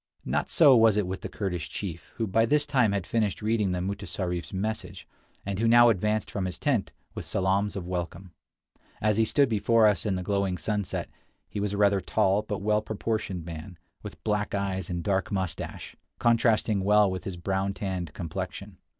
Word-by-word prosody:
Not 75 +4 -1
so 145 -5 +6
was 110 -3 +5
it 105 - +2
with 95 +1 -5
the - - -5
Kurdish 90 -6 -3
chief, 85 -4 -6
who 115 - -1
by 115 +3 +2
this 145 +3 +3
time 125 -8 +2
had 100 -3 -1
finished 110 -1 -1
reading 105 -3 +1
the 90 0 -1
mutessarif's 90 -3 -4
message, 110 +3 -4 0.4
and 100 0 -3
who 115 - +2
now 120 +1 +7
advanced 105 +1 0
from 100 -2 -2
his 90 - -4
tent 130 -9 0 0.2
with - - -6
salaams 95 +2 0
of 95 -3 -4
welcome. 90 +1 -5 0.7
As 105 -1 +1
he 110 - +4
stood 140 +4 +3
before 115 0 +3
us 105 -5 +3
in 95 - +1
the 90 - -3
glowing 100 -1 0
sunset, 105 +4 -2 0.4
he - - -5
was 100 0 -1
a - - -2
rather 100 -1 +3
tall, 95 +3 +2
but 105 -2 -5
well 105 0 +2
proportioned 110 -5 -3
man, 85 +2 -8 0.2
with 105 - -10
black 105 -1 -1
eyes 95 -3 -2
and 85 -1 -3
dark 95 0 0
mustache, 95 -4 -4 0.2
contrasting 115 -3 +2
well 105 0 +4
with 95 - -4
his 95 -3 -5
brown 95 +2 -1
tanned 90 -5 -3
complexion. 85 -3 -6
100 Hz, 190 wpm, -27 LUFS, 95-110 Hz, 0.7 s, now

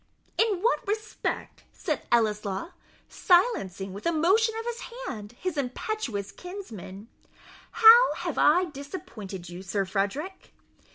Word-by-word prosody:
"In 420 -5 +2
what 470 - +1
respect," 430 +2 -3
said 310 -4 -4
Ellieslaw, 210 - +1 0.4
silencing, 200 - +2
with 200 +10 -5
a - - +3
motion 395 +8 +3
of 455 - -6
his 475 -1 -4 0.3
hand, 210 - -6
his 325 +3 -3
impetuous 250 - -3
kinsman 230 - -9 0.6
"how 465 +2 +8
have - - -3
I 365 +1 +5
disappointed 270 - -8
you, 175 +1 -8
Sir 195 +1 -1
Frederick?" 205 - -3
295 Hz, 120 wpm, -27 LUFS, -, 0.6 s, how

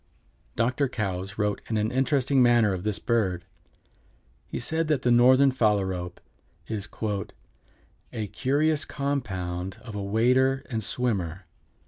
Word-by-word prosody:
Dr. 125 +4 +1
Coues 95 -4 -4
wrote 105 -1 -1
in 110 - 0
an 105 +2 0
interesting 135 +1 +2
manner 120 -4 +4
of 90 -1 -4
this 105 -2 -1
bird. 100 -7 0 1.0
He - - -5
said 160 +6 0
that 150 -4 0
the 125 - +3
Northern 130 +3 +6
Phalarope 95 -7 0 0.5
is 105 -2 -4 1.2
"a 110 - -3
curious 145 - +1
compound 95 -10 -3
of 115 -4 -9
a 105 - -4
wader 125 +6 +2
and 110 -2 -2
swimmer. 95 -7 -2
115 Hz, 125 wpm, -26 LUFS, 100-130 Hz, 1.2 s, Northern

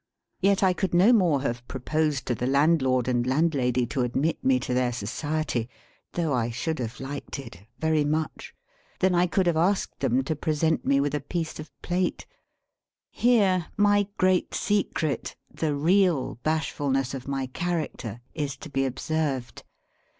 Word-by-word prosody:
Yet 195 0 +3
I 185 -1 +4
could 185 -1 -1
no 195 +8 +6
more 170 - +3
have 120 -2 -3
proposed 145 +1 -1
to 125 - 0
the 125 +2 -2
landlord 135 -3 +3
and 120 -1 +1
landlady 130 -4 +2
to 130 +2 -2
admit 135 +6 0
me 130 -1 +3
to 125 - -2
their 125 -1 +1
society 125 0 -2 0.4
(though 165 -4 0
I 120 -2 0
should 160 +7 -3
have 115 -1 -4
liked 140 +2 -6
it 105 -8 -11
very 160 -1 +2
much) 155 +1 -3 0.4
than 185 0 +3
I 175 +1 +3
could 185 +2 +1
have 170 -2 +2
asked 190 +5 +1
them 130 -1 +1
to 155 +4 -2
present 155 +2 0
me 140 0 +4
with 145 +1 0
a 150 - 0
piece 160 +2 -4
of 155 - -8
plate. 180 +1 -1 0.9
Here 200 -8 +3
my 205 -1 +4
great 185 -1 +2
secret, 195 -7 -1 0.2
the 155 -3 -1
real 165 -4 +2
bashfulness 140 -4 0
of 135 -1 -6
my 135 -1 -1
character, 140 - -3
is 145 -4 -3
to 155 - -10
be 135 -1 +1
observed. 135 -3 -2
150 Hz, 160 wpm, -26 LUFS, 130-170 Hz, 0.9 s, no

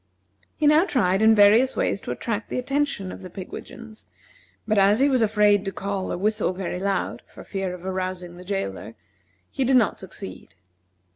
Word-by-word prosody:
He 305 - -1
now 300 +3 +6
tried 195 - +1
in 220 0 +6
various 215 +5 +5
ways - - 0
to - - -8
attract 210 - -3
the - - -3
attention 275 -7 -1
of - - -9
the 185 - -9
pigwidgeons; 215 +4 -10 0.6
but 215 -1 +2
as 200 +3 +4
he 275 - +4
was 260 -3 +2
afraid 210 -2 +3
to 195 - -2
call 195 0 -4
or - - -2
whistle 210 0 0
very 180 -1 -4
loud, 195 0 -2
for - - -13
fear 195 -2 -4
of 180 0 -12
arousing 185 -2 -4
the 180 - -11
jailor, 115 - -4 0.6
he 270 - -1
did 260 +1 +3
not 230 - +1
succeed. 190 +1 -8
200 Hz, 185 wpm, -24 LUFS, 185-225 Hz, 0.6 s, now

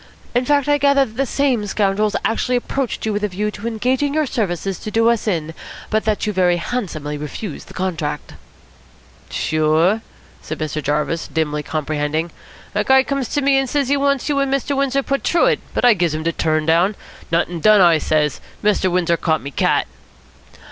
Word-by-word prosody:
In 245 +1 +1
fact, 285 0 +2
I 290 0 +3
gather 280 -1 +4
that 220 -3 -14
the 270 +2 0
same 255 -7 0
scoundrels 205 +1 +1
actually 250 +3 0
approached 250 0 -2
you 220 - 0
with 205 +1 -2
a - - +2
view 210 +2 -2
to 210 +2 -6
engaging 255 +5 0
your 310 -1 +2
services 195 - -2
to - - -6
do 225 +2 +2
us 230 -1 -2
in, 165 -5 -1 0.4
but 215 -1 +1
that 215 -1 0
you 210 - -1
very 180 -2 +3
handsomely 160 -9 -4
refused 150 +4 -6
the - - -13
contract." 170 -5 -3 1.0
"Sure," 155 +7 +1 0.4
said 155 - -6
Mr. 155 0 -3
Jarvis, 150 +3 -1
dimly 150 -2 -1
comprehending. 155 +2 -2 0.4
"A 210 0 +1
guy 265 +3 +5
comes 275 -2 -2
to 290 - 0
me 275 0 +4
and 270 -1 -1
says 280 -2 0
he 285 - +3
wants 280 -2 +1
you 285 -2 +1
and 275 -1 0
Mr. 275 +1 0
Windsor 275 0 +1
put 275 +1 -1
through 345 - +3
it, - - +2 0.2
but - - +2
I 245 - +7
gives 175 -5 0
him 155 - -3
de 165 - +1
t'run 155 -1 0
down. 170 +6 +3 0.4
'Nuttin' 170 +1 0
done,' 215 +4 +5
I 170 -3 +5
says. 150 -2 0 0.2
'Mr. 205 -2 +2
Windsor 175 -1 +1
caught 160 -2 0
me 140 - -6
cat.'" - - +1
210 Hz, 195 wpm, -19 LUFS, 160-260 Hz, 1.0 s, I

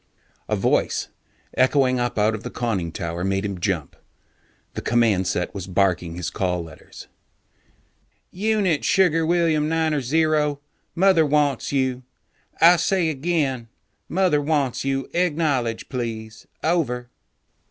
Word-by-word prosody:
A - - +1
voice, - - 0 0.4
echoing 130 -1 +2
up 120 -1 -2
out 105 +1 +2
of 105 - -5
the - - -6
conning 100 -9 -2
tower, 85 +1 -4
made 95 +1 -1
him 100 -3 -4
jump. 85 -6 -2 0.8
The - - -5
command 110 -6 +2
set 90 0 -2
was 95 -3 -6
barking 90 -3 0
his 90 -1 -4
call 90 -2 -1
letters. 80 -1 -13 1.3
"Unit 200 -5 0
Sugar 170 -4 +3
William 165 -3 +2
Niner 160 -2 +1
Zero, 150 +1 +1 0.4
Mother 185 -2 +4
wants 145 -2 +1
you. 130 -2 0 0.6
I 175 +2 +7
say 180 -2 +1
again: 140 -5 -1 0.4
Mother 180 -5 +2
wants 145 -4 0
you. 135 0 -1
Acknowledge 150 -9 0
please. 110 -3 -6 0.2
Over." 125 -8 -1
135 Hz, 125 wpm, -23 LUFS, 105-160 Hz, 1.3 s, I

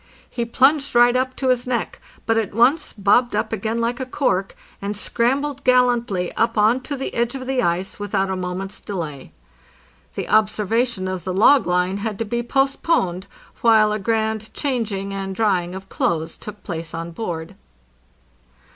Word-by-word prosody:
He 235 - -3
plunged 270 +4 +2
right 240 +1 +6
up 255 0 0
to 265 - -1
his 250 -1 +1
neck, 240 -3 -2 0.2
but 225 - +2
at 220 -3 -1
once 255 +8 +3
bobbed 215 +4 +2
up 215 - -1
again 220 +2 -2
like 235 +2 -1
a 260 - -2
cork, 195 -8 0 0.3
and 200 +1 -3
scrambled 270 +6 0
gallantly 240 -7 +2
up 230 0 0
on 220 +5 +4
to 285 +3 -4
the 265 - -4
edge 235 +2 0
of 260 -1 -6
the 260 -1 0
ice 180 -1 -1
without 195 -1 -1
a - - -1
mo 180 -1 -3
ment's 195 +2 -5
delay. 160 -9 -6 0.8
The - - -4
observation 215 0 +1
of 185 -2 -4
the 185 +1 -3
log 230 +3 +5
line 180 +2 +1
had 210 0 -3
to 225 - -2
be 235 +3 -2
post 270 +3 0
poned, 190 - 0 0.3
while 220 -2 +5
a 210 - -1
grand 220 0 -1
changing 220 -8 -2
and 195 -1 -4
drying 185 -4 0
of 190 0 -8
clothes 160 -3 -1
took 210 -1 -10
place 165 -3 -5
on 165 +1 -5
board. 170 -2 -5
220 Hz, 175 wpm, -21 LUFS, 190-245 Hz, 0.8 s, right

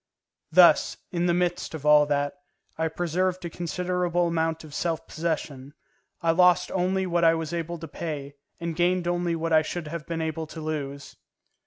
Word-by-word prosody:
Thus, - - +6
in 175 -1 0
the 175 - +3
midst 175 -1 -1
of 150 -2 -8
all 150 0 +6
that, 145 -1 0 0.4
I 160 0 0
preserved 175 +2 -1
a 170 - -5
considerable 175 0 -1
amount 165 -1 -1
of 155 -2 -12
self 165 +1 -2
possession; 150 -4 -4 0.5
I 165 - +4
lost 180 +1 +4
only 190 +1 0
what 175 -1 0
I 165 0 +6
was 160 0 -4
able 170 0 -3
to 165 0 -8
pay, 145 -5 -5 0.3
and 170 -1 -3
gained 175 +1 +1
only 175 -1 0
what 165 0 -2
I 155 - +6
should 160 0 -5
have 165 -1 -6
been 165 -1 -3
able 160 0 -3
to 160 - -9
lose. 145 -3 -5
165 Hz, 180 wpm, -26 LUFS, 155-175 Hz, 0.5 s, Thus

